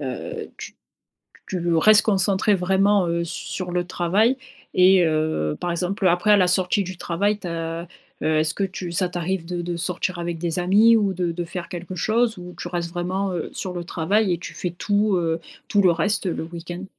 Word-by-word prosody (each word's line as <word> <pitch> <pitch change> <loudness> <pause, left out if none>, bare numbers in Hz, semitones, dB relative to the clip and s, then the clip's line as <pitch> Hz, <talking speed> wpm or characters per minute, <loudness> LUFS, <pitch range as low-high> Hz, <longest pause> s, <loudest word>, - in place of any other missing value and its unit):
heu, 130 -3 -5
tu - - -9 0.7
tu 175 -2 -1
restes 215 +5 +6
concentré, 195 0 +2
vraiment, 190 +1 +3
heu, 170 0 0
sur 180 +2 -5
le 175 0 -1
travail. 195 +9 +2 0.4
Et 185 0 +6
heu, 155 - 0
par 175 - -2
exemple, 185 +3 -1
après 180 +4 +3
à 210 - +8
la 185 -2 +4
sortie 185 +2 +1
du 185 0 -7
travail, 200 +5 0
tu 195 - -8
as, 165 0 -4 0.3
heu - - 0
est-ce 155 +1 +1
que 200 - 0
tu 185 -2 -5
ça 180 +1 +1
t'arrive 175 0 -2
de 175 0 -3
de 175 0 -3
sortir 180 +1 -2
avec 170 -1 -3
des 170 +1 -2
amis 210 +6 +5
ou 205 -3 +2
de 175 -1 -1
de 175 +1 -4
faire 170 0 -6
quelque 180 +1 -6
chose, 225 +5 +1
ou 180 0 -9
tu - - -5
restes 170 -1 -3
vraiment, 185 +2 -2
heu, 175 -3 -3
sur 185 - -4
le 175 -1 -4
travail 190 +4 +1
et - - -5
tu 175 - -8
fais 180 - -3
tout, 205 +3 +1
heu, 165 -2 0 0.3
tout 205 - +3
le 185 - +5
reste 190 +5 0
le 170 - -2
week-end? 175 +2 -7
180 Hz, 205 wpm, -23 LUFS, 170-195 Hz, 0.7 s, à